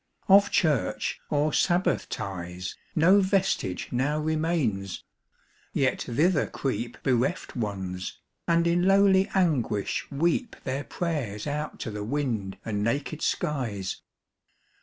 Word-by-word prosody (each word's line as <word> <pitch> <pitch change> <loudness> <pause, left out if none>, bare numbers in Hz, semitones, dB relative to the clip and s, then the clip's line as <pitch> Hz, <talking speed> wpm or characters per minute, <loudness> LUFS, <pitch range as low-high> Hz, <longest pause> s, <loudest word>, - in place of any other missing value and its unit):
Of 200 +1 +7
church, 135 - +1
or 150 +1 +1
sabbath 180 +1 +2
ties, 90 -4 -5 0.2
5 - - -7
No 180 +6 +6
vestige 190 - 0
now 135 +5 +1
remains; 155 - -1 0.7
yet 130 -2 +1
thither 150 +6 +2
creep 120 -3 -3
Bereft 130 +7 0
Ones, 95 -5 -4 0.3
and 170 0 +3
in 175 +2 +2
lowly 195 -1 +5
anguish 145 - +1
weep 170 - 0
Their 135 +2 -3
prayers 135 - -3
out 150 +1 -3
to 115 - -3
the 105 0 -4
wind 115 -6 -2
and 105 -2 -1
naked 140 +7 -1
skies. 120 - -2
140 Hz, 115 wpm, -27 LUFS, 105-170 Hz, 0.7 s, Of